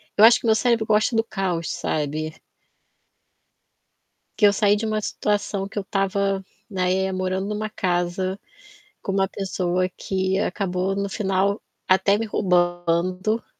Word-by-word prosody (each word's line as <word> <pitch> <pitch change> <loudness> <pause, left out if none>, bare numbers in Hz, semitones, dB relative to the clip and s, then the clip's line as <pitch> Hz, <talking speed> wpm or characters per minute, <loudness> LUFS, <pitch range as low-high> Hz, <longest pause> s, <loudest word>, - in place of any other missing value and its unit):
eu 210 - +5
acho 235 +2 +8
que - - -9
meu 220 -1 +4
cérebro 230 -1 +2
gosta 215 +2 +2
do 225 - +3
caos, 185 -6 -2
sabe? 155 +1 -3 2.0
Que 210 - +7
eu 200 - +4
saí 205 +1 +3
de 220 - -3
uma 215 -1 -1
situação 205 -1 -1
que 200 - -12
eu 205 - 0
tava, 195 0 0 0.3
né, 190 0 +1
morando 185 0 -1
numa 210 +1 -3
casa 185 0 -1 0.6
com 195 - -3
uma 195 0 +2
pessoa 185 -2 -1
que 190 +1 -1
acabou, 190 -1 -1
no 200 0 -1
final, 195 0 0 0.3
até 195 +2 +4
me 225 - -2
roubando. 180 +1 +1
195 Hz, 140 wpm, -23 LUFS, 185-210 Hz, 2.0 s, acho